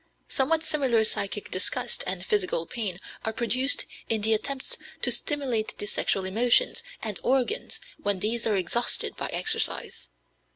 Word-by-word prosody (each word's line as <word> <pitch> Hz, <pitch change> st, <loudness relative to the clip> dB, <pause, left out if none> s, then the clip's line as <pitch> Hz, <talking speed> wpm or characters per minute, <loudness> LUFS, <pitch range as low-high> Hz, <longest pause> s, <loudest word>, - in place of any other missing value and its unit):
Somewhat 315 Hz, +4 st, +1 dB
similar 255 Hz, -7 st, +2 dB
psychic 205 Hz, -1 st, -3 dB
disgust 185 Hz, -, -1 dB
and -, -, -2 dB
physical 390 Hz, -, +1 dB
pain 205 Hz, -6 st, -3 dB, 0.2 s
are 220 Hz, -, -1 dB
produced 250 Hz, +4 st, +2 dB, 0.2 s
in 220 Hz, -2 st, +1 dB
the 220 Hz, +2 st, +3 dB
attempts 265 Hz, +5 st, -2 dB, 0.3 s
to -, -, +4 dB
stimulate 260 Hz, -7 st, -1 dB
the -, -, -3 dB
sexual 195 Hz, -2 st, 0 dB
emotions 230 Hz, +6 st, +3 dB, 0.2 s
and 215 Hz, -3 st, -2 dB
organs 265 Hz, -, 0 dB, 0.2 s
when 205 Hz, -1 st, +1 dB
these 225 Hz, +4 st, +1 dB
are 210 Hz, -2 st, +2 dB
exhausted 235 Hz, +6 st, 0 dB
by -, -, -3 dB
exercise. -, -, +2 dB
230 Hz, 140 wpm, -27 LUFS, 205-265 Hz, 0.3 s, to